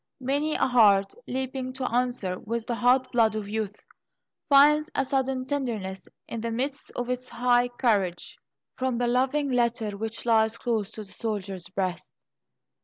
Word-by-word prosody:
many 285 +4 0
a - - +2
heart, 205 -6 +4
leaping 260 0 -3
to 255 0 -3
answer 240 -7 0
with 230 +1 -4
the 240 - -2
hot 250 +2 +3
blood 225 -3 +3
of 215 -2 -3
youth, 210 -1 -4 0.7
finds 300 +2 +6
a 270 - +1
sudden 265 -1 -1
tenderness 225 -10 -3 0.2
in 230 - -5
the 230 - -2
midst 265 +5 -3
of 245 - -2
its 250 0 -3
high 245 0 +2
courage, 210 -8 0 0.4
from 260 -2 -1
the 245 - +1
loving 265 +4 +1
letter 235 -4 0
which 225 +3 -4
lies 220 -1 +3
close 220 -4 -1
to 220 - -8
the 200 -3 -10
soldier's 200 -5 -4
breast. 185 -2 -3
240 Hz, 160 wpm, -26 LUFS, 215-260 Hz, 0.7 s, finds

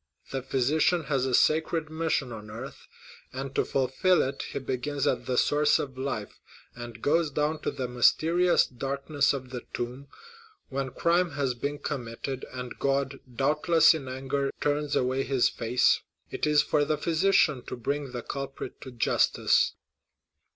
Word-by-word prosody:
The 135 - -2
physician 150 +6 +1
has 135 -3 0
a 125 - +2
sacred 160 0 +2
mission 160 -5 -1
on 105 -2 -8
earth; 115 +6 -9 0.4
and 135 +1 -5
to - - +2
fulfil 135 +8 +2
it 135 +1 -3
he - - -4
begins 135 +2 -2
at - - 0
the 125 -1 0
source 150 +3 +3
of 135 -2 -5
life, 130 -5 -4 0.3
and 120 -2 -9
goes 160 +2 +2
down 150 +2 -1
to - - -1
the 130 - -4
mysterious 165 +8 +3
darkness 140 +3 -1
of 130 -2 -5
the 125 -2 -5
tomb. 125 +3 -5 0.6
When 135 0 -2
crime 170 +5 +1
has 140 -3 0
been 140 +4 -3
committed, 130 -1 -5
and 125 -1 -7
God, 135 0 0
doubtless 150 +6 +4
in 150 -5 -5
anger, 135 +2 -2
turns 145 0 0
away 130 +1 +1
his 135 -3 +2
face, 120 +2 +2 0.3
it - - -1
is 150 0 +4
for 150 -1 +2
the 150 +1 0
physician 160 -4 +2
to - - -5
bring 140 +3 -3
the 120 -2 -5
culprit 135 -1 -6
to 130 - -8
justice." 120 - +2
135 Hz, 160 wpm, -28 LUFS, 130-150 Hz, 0.6 s, doubtless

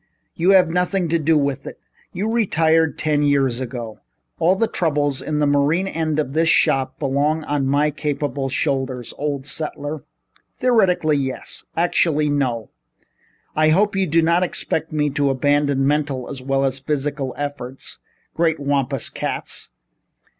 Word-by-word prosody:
You 175 +3 +1
have 180 -4 +5
nothing 180 0 0
to 170 +1 +2
do 155 +1 +3
with 140 -1 -1
it. - - -9 0.3
You 200 +4 -3
retired 165 - +2
ten 150 -1 +1
years 140 -4 +2
ago. 120 -3 -6 0.4
All 175 +3 +4
the 225 - +2
troubles 145 -8 0
in 155 - -2
the 150 - +2
marine 145 +6 +2
end 160 -4 -1
of 140 -3 -1
this 165 +1 +2
shop 135 -4 +2
belong 145 +3 0
on 145 -2 -1
my 145 +2 +2
capable 145 -2 -2
shoulders, 130 -3 -2
old 140 -2 -2
settler." 150 0 -5 0.5
"Theoretically 185 -11 +3
yes. 130 -2 -5
Actually 160 -3 +2
no. 125 -6 -1 0.8
I 155 0 +4
hope 200 +5 +3
you 195 -1 +1
do 165 +1 +3
not 170 +2 +3
expect 165 -2 -2
me 150 -1 0
to 140 0 +1
abandon 140 0 +1
mental 145 -3 0
as 135 -2 -6
well 135 +1 0
as 135 0 -1
physical 140 -1 -2
effort. 145 -3 -6 0.4
Great 160 -2 +1
Wampus 140 -2 0
Cats! - - -3
145 Hz, 150 wpm, -21 LUFS, 135-160 Hz, 0.8 s, have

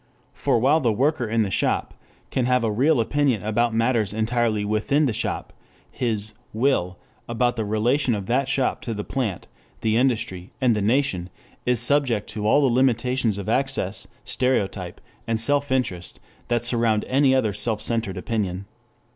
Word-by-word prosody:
For 135 -4 +1
while 135 +7 +3
the 120 -7 +1
worker 130 +2 0
in 110 +1 +1
the 100 - -3
shop - - 0 0.4
can 130 - 0
have 125 -1 +2
a 110 - +1
real 135 +6 +2
opinion 130 -2 +1
about 115 +3 +1
matters 115 -2 +1
entirely 110 -1 0
within 110 +8 +1
the 125 - 0
shop, - - -3 0.4
his 110 -3 -2 0.2
"will" 110 -7 0 0.3
about 120 +1 +1
the 110 -2 -2
relation 120 +4 +1
of 100 -2 -5
that 130 +5 0
shop 135 -2 0
to 115 - -4
the 105 - -4
plant, 110 -9 -3 0.4
the 110 0 +1
industry, 110 -8 0
and 125 -4 +3
the 105 - -1
nation 105 -5 0 0.4
is 125 -2 +3
subject 135 -6 +2
to 105 -1 -3
all 145 - +4
the 120 - +1
limitations 125 -3 +1
of 100 0 -6
access, 130 -4 -1 0.2
stereotype, 120 -8 -1 0.3
and 115 -1 0
self 145 +4 +2
interest 95 -10 -2 0.3
that 120 -1 0
surround 115 -3 +2
any 135 0 +3
other 110 -6 +1
self 105 +1 -1
centered 110 -4 -1
opinion. 100 -2 -3
115 Hz, 165 wpm, -23 LUFS, 105-130 Hz, 0.4 s, all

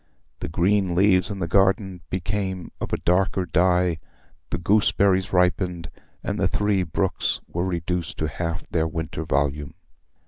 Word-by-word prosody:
The - - -4
green 95 +2 +1
leaves 95 0 +4
in 100 - -4
the 90 -3 -2
garden 95 0 +2
became 95 0 -3
of - - -4
a - - +1
darker 95 +1 +1
dye, 90 -1 +2 0.5
the - - -1
gooseberries 100 0 +2
ripened, 90 -1 +1 0.3
and - - -2
the - - +2
three 105 -1 +1
brooks 90 +2 -1
were 85 +2 -2
reduced 85 -1 -3
to 80 - -1
half 85 +2 -4
their 80 -1 +1
winter 80 0 -4
volume. 70 0 -1
90 Hz, 145 wpm, -24 LUFS, 85-95 Hz, 0.5 s, leaves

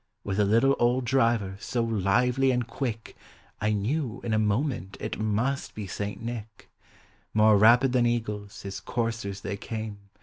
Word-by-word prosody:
With 100 0 -2
a 105 - +4
little 115 +7 +4
old 120 +1 +2
driver, 115 -6 +1
so 120 +1 -1
lively 115 +5 +2
and 125 -2 +1
quick 115 -1 -4 0.4
1 105 0 +1
knew 130 -1 -1
in 115 - -1
a 110 - +3
moment 105 -1 -1
it - - -4
must 110 +6 -1
be 105 - -5
St. 100 +2 -4
Nick. 115 -2 -7 0.6
More 110 0 +6
rapid 120 +5 +6
than 120 -2 +3
eagles 105 -4 -3
his 100 -1 -5
coursers 115 -4 -3
they 100 - -4
came. 110 -1 -5
115 Hz, 160 wpm, -27 LUFS, 105-120 Hz, 0.6 s, More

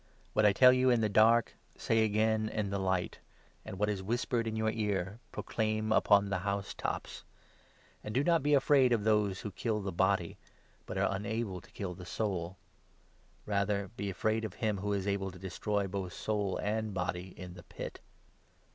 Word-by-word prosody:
What 110 0 +4
I - - +6
tell 125 +5 +7
you 130 0 +3
in 120 -2 +3
the 110 - +2
dark, 115 +3 +4 0.2
say 115 -1 +2
agam 110 +1 +1
in 105 -3 -2
the 100 - -1
light; 95 -2 -1 0.4
and 95 - -7
what 105 +2 +1
is 105 -2 -1
whispered 115 +2 -1
in 110 - -2
your 110 0 +1
ear, 105 -2 -2
proclaim 110 -1 -1
upon 100 -2 +4
the 95 - 0
housetops. 100 +1 -3 0.8
And 105 - -5
do 130 +6 +1
not 170 +1 +3
be 145 +1 +3
afraid 135 -2 +4
of 110 -3 +1
those 105 -3 +2
who 105 - -5
kill 110 0 -1
the 100 -1 -3
body, 95 -1 +1 0.5
but 95 - -4
are 100 0 +1
unable 105 -2 -3
to - - -19
kill 95 -3 -5
the 90 0 -10
soul; 95 -5 -2 0.9
rather 100 -1 0
be 100 -1 -3
afraid 110 +4 0
of 110 -4 -5
him 105 -3 -1
who 105 +2 -2
is 100 -2 -1
able 100 -1 -1
to 95 - -11
destroy 100 +2 -2
both 95 -2 -4
soul 105 -3 -1
and 110 -1 -2
body 90 0 -3
in 90 -1 -8
the 90 - -11
Pit. - - -8
105 Hz, 185 wpm, -32 LUFS, 95-110 Hz, 0.9 s, tell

